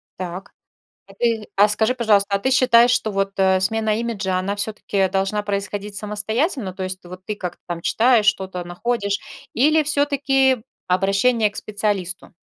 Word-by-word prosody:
Так. 185 +1 -7 0.6
А - - -14
ты 230 -3 0
а 205 +2 +6
скажи, 220 +4 +1
пожалуйста, 215 -5 +2
а - - -2
ты 260 +7 -1
считаешь, 250 -2 +5
что 220 -3 +1
вот, 195 -1 -1
э, 190 -1 +3
смена 220 +2 0
имиджа, 200 -6 -2
она 195 +2 -2
всё-таки 205 -2 -1
должна 195 +2 -1
происходить 200 0 -4
самостоятельно? 215 - -2
То 190 +1 -5
есть 185 0 -6
вот 180 +1 -11
ты 210 - -3
как-то 180 -4 -6
там 170 -1 -4
читаешь, 230 +2 +3
что-то 190 -3 0
находишь. 200 +3 -2 0.3
Или 305 +6 +3
всё-таки 275 -4 +2 0.2
обращение 200 +5 +2
к 210 - -14
специалисту? 205 -3 -3
205 Hz, 160 wpm, -21 LUFS, 190-235 Hz, 0.6 s, а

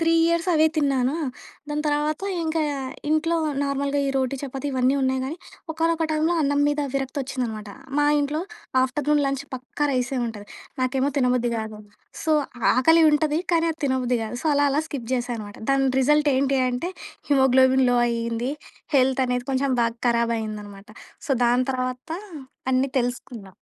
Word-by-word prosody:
3 330 0 +3
years 335 +1 +1
అవే 315 0 +5
తిన్నానా. 275 -2 +1 0.5
దాని 300 0 -2
తర్వాత 295 +2 0 0.2
ఇంకా 320 0 -1 0.5
ఇంట్లో 325 +2 +2 0.3
నార్మల్‌గా 280 0 0
ఈ - - +1
రోటీ, 260 0 0
చపాతీ 270 +1 -5
ఇవన్నీ 260 +1 +2
ఉన్నాయి 260 0 +1
కానీ 300 +5 -4 0.4
ఒకానొక 330 0 +1
టైమ్‌లో 315 +3 +1
అన్నం 285 0 +1
మీద 290 0 0
విరక్తి 270 +1 -2
వచ్చిందనమాట. 230 -5 -4 0.3
మా 290 - +4 0.2
ఇంట్లో 295 +3 -1 0.4
ఆఫ్టర్‌నూన్ 290 +3 +1
లంచ్ 275 0 -1
పక్కా 260 +3 -3
రైసే 255 +1 -1
ఉంటది. 210 -2 -7 0.4
నాకేమో 265 +2 +1
తినబుద్ధి 250 -2 +2
కాదు. 220 -1 -5 0.4
సో, 315 - +1 0.4
ఆకలి 325 +6 +5
ఉంటది 305 +1 +1
కానీ, 335 0 +3
అది 315 - -19
తినబుద్ధి 255 -2 +1
కాదు. 220 +2 -5
సో, - - -3
అలా 285 0 +3
అలా 295 +3 +1
స్కిప్ 245 -5 -6
చేసాననమాట. 235 -4 -4
దాని 270 -1 +3
రిజల్ట్ 295 +2 +3
ఏంటి 270 0 +2
అంటే, 290 +9 -3 0.4
హిమోగ్లోబిన్‌లో 260 -2 +4
అయింది. 235 +1 -2 0.5
హెల్త్ 265 0 +3
అనేది 250 +1 -2
కొంచెం 265 +1 +1
బాగా 230 0 0
ఖరాబ్ 235 0 +2
అయిందనమాట. 210 -1 -7 0.4
సో, - - -6
దాని 245 +2 +3
తర్వాత 255 +4 -4 0.6
అన్నీ 260 +1 +2
తెలుసుకున్నా. 240 -5 -4
265 Hz, 150 wpm, -24 LUFS, 245-295 Hz, 0.6 s, అవే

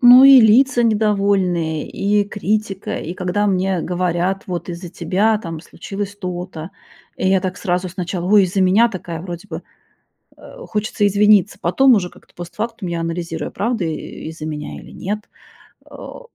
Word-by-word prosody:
Ну 245 +1 +9
и 275 -1 +9
лица 240 +3 +5
недовольные, 195 -7 +1
и 205 +1 +1
критика. 205 -1 -2
И 170 - -6
когда 185 +3 -1
мне 190 -2 0
говорят: 180 +2 -1
"Вот 180 -2 -5
из-за 175 +1 -6
тебя 210 +5 +1
там 165 -6 -7
случилось 200 +3 -7
то-то". 180 -3 -6 0.5
И 185 - 0
я 190 0 +3
так 185 0 -3
сразу 180 -1 -1
сначала: 180 -1 -4
"Ой, 205 -2 +6
из-за 190 +2 -1
меня". 195 +6 +4
Такая, 175 -5 -6
вроде 175 +3 -8
бы, - - -6 0.8
э, - - -19 0.3
хочется 210 -1 0
извиниться, 205 -1 +3
потом 260 +10 +4
уже 185 -5 0
как-то - - -21
постфактум 210 +4 -5
я 170 -1 -3
анализирую: 165 -1 -4
правда, 230 -2 -1
э, - - -1 0.4
из-за 160 -1 -7
меня 150 -1 -5
или - - -14
нет? 210 +3 -4 0.7
А, - - -10
190 Hz, 160 wpm, -19 LUFS, 175-210 Hz, 0.8 s, Ну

